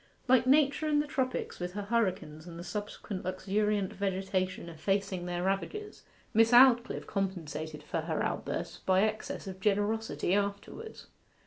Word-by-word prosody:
Like 255 Hz, 0 st, +5 dB
Nature 285 Hz, +2 st, +4 dB
in 300 Hz, -1 st, +3 dB
the 295 Hz, -, +1 dB
tropics, 260 Hz, -3 st, -2 dB
with 180 Hz, 0 st, -4 dB
her 205 Hz, +1 st, -3 dB
hurricanes 185 Hz, -8 st, -1 dB
and 170 Hz, -1 st, -8 dB
the 170 Hz, -, -6 dB
subsequent 205 Hz, 0 st, -5 dB
luxuriant 200 Hz, +2 st, 0 dB
vegetation 190 Hz, -2 st, -1 dB
effacing 185 Hz, +2 st, -1 dB
their 175 Hz, 0 st, -2 dB
ravages, 195 Hz, -, -2 dB, 0.3 s
Miss 225 Hz, +1 st, +5 dB
Aldclyffe 245 Hz, -1 st, +6 dB
compensated 160 Hz, -6 st, -3 dB
for 160 Hz, +2 st, -2 dB
her 160 Hz, -1 st, -1 dB
outbursts -, -, -3 dB
by 190 Hz, +1 st, +3 dB
excess 215 Hz, 0 st, -2 dB
of 190 Hz, -1 st, -7 dB
generosity 205 Hz, 0 st, 0 dB
afterwards. 200 Hz, -, -3 dB
200 Hz, 140 wpm, -31 LUFS, 185-225 Hz, 0.3 s, Aldclyffe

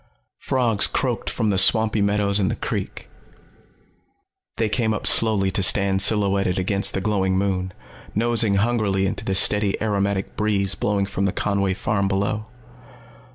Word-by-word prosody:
Frogs 120 Hz, -5 st, +1 dB
croaked 125 Hz, -4 st, -3 dB
from 110 Hz, -3 st, -2 dB
the 95 Hz, -, +1 dB
swampy 110 Hz, 0 st, +3 dB
meadows 100 Hz, 0 st, +1 dB
and 95 Hz, -1 st, 0 dB
the 115 Hz, -, -3 dB
creek. -, -, -6 dB, 1.5 s
They 110 Hz, -, 0 dB
came 110 Hz, 0 st, -1 dB
up -, -, -6 dB
slowly 105 Hz, -4 st, +3 dB
to 100 Hz, -, -1 dB
stand 95 Hz, +2 st, +3 dB
silhouetted 100 Hz, -3 st, +2 dB
against 100 Hz, +1 st, 0 dB
the 95 Hz, -, -2 dB
glowing 95 Hz, -2 st, -1 dB
moon, 95 Hz, -1 st, -2 dB, 0.4 s
nosing 115 Hz, -2 st, +2 dB
hungrily 100 Hz, -3 st, 0 dB
into -, -, -4 dB
the 95 Hz, -, -2 dB
steady, 105 Hz, +1 st, +2 dB
aromatic 100 Hz, -2 st, -2 dB
breeze 100 Hz, -2 st, 0 dB
blowing 100 Hz, -1 st, -1 dB
from 100 Hz, 0 st, -3 dB
the 100 Hz, -, 0 dB
Conway 100 Hz, -2 st, -2 dB
farm 100 Hz, 0 st, -2 dB
below. 100 Hz, +2 st, -2 dB
100 Hz, 150 wpm, -21 LUFS, 95-110 Hz, 1.5 s, swampy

